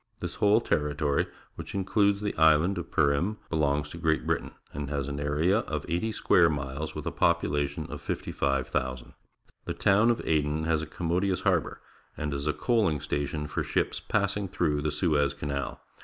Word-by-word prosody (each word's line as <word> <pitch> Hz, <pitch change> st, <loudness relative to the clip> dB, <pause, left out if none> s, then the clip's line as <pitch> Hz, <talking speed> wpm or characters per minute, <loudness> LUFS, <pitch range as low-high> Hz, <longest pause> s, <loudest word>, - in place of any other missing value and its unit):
This -, -, -4 dB
whole 105 Hz, +2 st, +3 dB
territory, 75 Hz, -5 st, 0 dB, 0.3 s
which -, -, -8 dB
includes 100 Hz, +1 st, +2 dB
the 105 Hz, -, -2 dB
island 80 Hz, +5 st, +4 dB
of -, -, -7 dB
Pcrim, 75 Hz, +9 st, +1 dB
belongs 75 Hz, -2 st, +1 dB
to 85 Hz, -, -8 dB
Great 80 Hz, -2 st, +1 dB
Britain, -, -, -2 dB, 0.2 s
and 70 Hz, -1 st, -4 dB
has 70 Hz, -2 st, -2 dB
an 70 Hz, 0 st, -4 dB
area 75 Hz, +8 st, +2 dB
of 75 Hz, -9 st, -4 dB
eighty 90 Hz, +8 st, -1 dB
square 90 Hz, -5 st, +4 dB
miles, 70 Hz, 0 st, -4 dB
with -, -, -5 dB
a -, -, -1 dB
population 75 Hz, +1 st, +1 dB
of -, -, -6 dB
55,000. 65 Hz, -2 st, -2 dB, 0.5 s
The -, -, -2 dB
town 105 Hz, +4 st, +4 dB
of 120 Hz, -, +2 dB
Aden 75 Hz, 0 st, +1 dB
has 80 Hz, -1 st, +1 dB
a 80 Hz, -, -5 dB
com 80 Hz, +3 st, -5 dB
modious 95 Hz, +1 st, +1 dB
harbour -, -, +1 dB, 0.4 s
and 75 Hz, -1 st, -2 dB
is 70 Hz, +1 st, -3 dB
a 75 Hz, -, +2 dB
coaling 95 Hz, -, +1 dB
station 75 Hz, +1 st, -2 dB
for 75 Hz, -, -2 dB
ships -, -, -1 dB
passing 100 Hz, -1 st, 0 dB
through 80 Hz, -5 st, 0 dB
the 75 Hz, 0 st, -1 dB
Suez 75 Hz, -3 st, +1 dB
Canal. 70 Hz, -2 st, -4 dB
75 Hz, 175 wpm, -28 LUFS, 70-90 Hz, 0.5 s, island